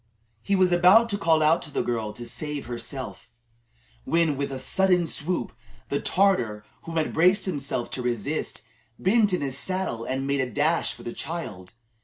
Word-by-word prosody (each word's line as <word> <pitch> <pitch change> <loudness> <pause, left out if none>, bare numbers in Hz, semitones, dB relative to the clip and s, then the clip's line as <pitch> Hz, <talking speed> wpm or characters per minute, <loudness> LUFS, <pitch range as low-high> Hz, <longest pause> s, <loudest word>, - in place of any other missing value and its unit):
He 200 - +1
was 185 -1 +3
about 185 +7 +6
to 200 - -1
call 160 -3 +3
out 160 +2 +4
to - - -9
the - - -1
girl 115 -3 -2
to 120 +3 -8
save 150 +1 -4
herself, 120 +1 -7 0.7
when, 165 - +2
with 140 0 -3
a 135 - -4
sudden 180 +5 +2
swoop, 160 -2 -2 0.4
the 140 - -1
Tartar 120 - +1 0.2
whom 165 0 -4
he 160 - +3
had - - -6
braced 180 +5 +4
himself 140 -8 -2
to 130 - -3
resist, 120 -4 -2 0.3
bent 210 +2 +3
in 180 - 0
his 135 -1 -2
saddle 185 -9 -2
and 130 +2 -2
made 140 0 +1
a 130 - -2
dash 155 +5 +1
for - - -13
the 120 - -5
child. 110 - -6
150 Hz, 185 wpm, -25 LUFS, 125-180 Hz, 0.7 s, about